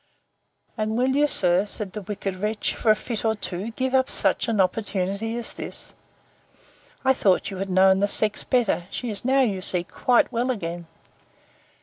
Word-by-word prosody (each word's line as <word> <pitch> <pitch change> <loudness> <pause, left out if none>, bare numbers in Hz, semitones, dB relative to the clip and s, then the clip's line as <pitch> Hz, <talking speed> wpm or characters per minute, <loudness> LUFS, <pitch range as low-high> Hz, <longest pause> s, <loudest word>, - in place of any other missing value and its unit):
And 215 +1 -1
will 255 +2 +2
you, 295 +1 +4
sir, 180 -8 +3
said 200 -2 -6
the 210 - -5
wicked 195 -1 -4
wretch, 210 +2 -2
for 225 - -1
a 215 - +7
fit 225 +1 -5
or 220 -1 +1
two, 200 0 -4
give 260 +3 -3
up 260 0 +3
such - - +1
an 225 -3 0
opportunity 200 +3 -1
as 240 - -6
this?—I 265 0 -7
thought 195 -5 +1
you 195 - -6
had 195 +1 -4
known 190 +1 +4
the 200 - +2
sex 215 +1 +1
better. 225 -8 0
She 245 -3 -4
is 200 - -5
now, 265 +2 +3
you 200 -7 0
see, 180 -2 +3
quite 245 +8 +1
well 245 +1 -1
again! 175 -7 -4
210 Hz, 180 wpm, -24 LUFS, 190-240 Hz, -, a